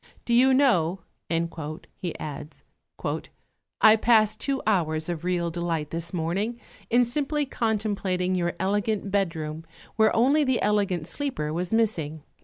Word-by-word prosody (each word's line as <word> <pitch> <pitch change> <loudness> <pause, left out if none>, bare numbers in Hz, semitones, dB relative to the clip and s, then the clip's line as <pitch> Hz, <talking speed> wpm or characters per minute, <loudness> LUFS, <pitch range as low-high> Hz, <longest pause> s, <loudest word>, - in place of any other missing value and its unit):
Do 240 - 0
you 255 +3 +6
know," 195 - +3 1.0
he 180 -4 -4
adds, 150 0 -7 1.2
"I 215 0 +8
passed 215 -1 +3
two 275 -1 0
hours 160 -6 +1
of 170 -2 -3
real 175 -2 0
delight 165 -3 -2
this 170 +1 -4
morning 190 +8 -2 0.3
in 245 +1 +4
simply 290 +4 -1
contemplating 205 -7 -1
your 175 -1 0
elegant 205 +1 0
bedroom 165 -5 -1 0.3
where 220 -1 +4
only 275 +6 +4
the 260 -3 +1
elegant 200 -6 +1
sleeper 170 - -3
was 175 +2 -2
missing." 165 -10 0
195 Hz, 130 wpm, -26 LUFS, 170-230 Hz, 1.2 s, I